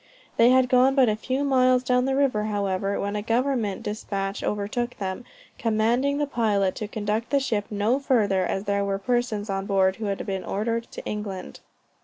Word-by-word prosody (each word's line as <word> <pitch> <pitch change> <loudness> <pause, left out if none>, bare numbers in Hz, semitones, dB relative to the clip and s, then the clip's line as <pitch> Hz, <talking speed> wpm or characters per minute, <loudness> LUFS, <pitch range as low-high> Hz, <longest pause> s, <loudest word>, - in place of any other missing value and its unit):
They 230 +1 +6
had 255 0 +5
got 255 +2 +4
but 260 -4 +5
a 210 - +1
few 260 +5 -2
miles 255 -2 +3
down 250 0 +2
the 270 0 0
river, 255 -7 +1
however, 200 -2 -1
when 200 +1 -2
a 210 - -1
government 230 -3 0
despatch 200 -2 -4
overtook 220 +4 -2
them, 195 +4 -4 0.3
commanding 235 +5 +1
the 295 - +1
pilot 210 -8 +1
to 215 - -4
conduct 215 +2 -2
the 280 - +3
ship 220 -6 -1
no 215 +5 +1
further, 210 -9 +2
as 190 +2 -2
there 200 -1 0
were 200 -1 -1
persons 230 -1 -1
on 195 -1 -3
board 190 -1 +2
who 225 - -4
had 200 -1 -3
been 190 -1 -3
ordered 230 +3 -2
to - - -8
England. 205 -3 -5
215 Hz, 190 wpm, -25 LUFS, 200-250 Hz, 0.3 s, They